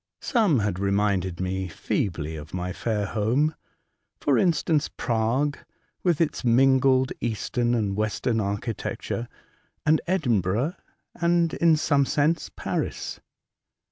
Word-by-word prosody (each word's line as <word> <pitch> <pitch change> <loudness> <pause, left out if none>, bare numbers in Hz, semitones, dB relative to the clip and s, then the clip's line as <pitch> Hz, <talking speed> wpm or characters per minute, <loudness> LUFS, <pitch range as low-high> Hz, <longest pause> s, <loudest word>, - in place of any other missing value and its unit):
Some 215 - +3
had 100 -3 -1
reminded 100 -3 0
me 95 0 -2
feebly 80 -2 -2
of 75 +3 -8
my 90 0 -3
fair 105 -1 -1
home; 120 +10 +1 0.7
for 140 - +2
instance, 165 -4 +2
Prague, 120 +5 0 0.4
with 175 -5 +1
its 160 -3 0
mingled 130 +1 +4
eastern 120 +1 0
and 105 -4 0
western 110 +2 0
archi 105 +3 -2
tecture, 115 +3 -4 0.6
and 155 +1 +4
Edinburgh, 125 - +1 0.4
and, 170 -1 +1
in 165 -1 +4
some 145 -3 +2
sense, 150 +2 +1
Paris. - - -3
120 Hz, 115 wpm, -25 LUFS, 100-150 Hz, 0.7 s, mingled